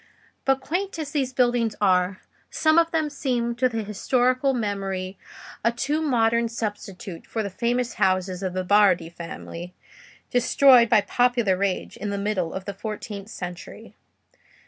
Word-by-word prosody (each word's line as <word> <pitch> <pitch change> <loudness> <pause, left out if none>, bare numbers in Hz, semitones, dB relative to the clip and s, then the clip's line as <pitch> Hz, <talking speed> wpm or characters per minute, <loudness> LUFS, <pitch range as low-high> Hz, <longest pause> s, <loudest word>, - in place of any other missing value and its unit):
But 270 0 +2
quaint 360 +7 -2
as 305 -3 -4
these 270 -4 -1
buildings 240 -3 +1
are, 185 -1 +2 0.3
some 315 +1 +3
of 335 0 +2
them 320 -2 0
seem 250 -5 -1
to 255 +1 +3
the 225 -2 -3
historical 250 +6 +1
memory 195 -5 -3 0.4
a 230 - +3
too 285 +6 -1
modern 235 -5 +2
substitute 205 -5 -6
for 225 - -2
the 200 - -4
famous 240 +3 -1
houses 185 -1 +1
of 185 -2 -3
the 185 0 -2
Bardi 185 -4 +4
family, 170 +1 -8 0.6
destroyed 245 0 +5
by 215 -2 +5
popular 240 -2 +2
rage 195 0 -2
in 210 - -4
the 200 - -2
middle 200 -4 -1
of 190 0 -6
the 200 - -4
fourteenth 210 0 -6
century. 180 -4 -8
220 Hz, 150 wpm, -24 LUFS, 190-250 Hz, 0.6 s, destroyed